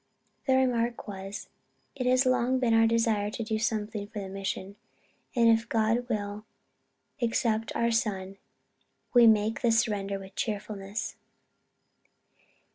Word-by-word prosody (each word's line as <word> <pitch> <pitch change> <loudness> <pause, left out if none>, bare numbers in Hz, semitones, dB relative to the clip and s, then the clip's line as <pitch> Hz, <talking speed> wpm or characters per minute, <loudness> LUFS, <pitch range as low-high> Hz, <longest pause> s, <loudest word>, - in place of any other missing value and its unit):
Their 260 -1 +4
remark 235 -1 -1
was, 195 0 -6 0.5
_It 255 -2 -2
has 255 +1 +4
long 255 0 +2
been 245 -3 +2
our 225 0 +5
desire 225 -2 +1
to 230 - -4
do 220 0 -2
something 215 -2 -2
for 215 - -10
the 195 -2 -4
mission; 195 0 -4 0.6
and 235 -1 +4
if 230 0 +3
God 230 +2 +1
will 205 -2 -3 0.8
accept 225 -1 0
our 235 0 +2
son, 195 -4 -1 0.8
we 240 -2 +8
make 220 0 +3
the 235 - +3
surrender 205 -3 +1
with 195 0 -11
cheerfulness_. 205 -1 -4
220 Hz, 130 wpm, -28 LUFS, 205-235 Hz, 0.8 s, we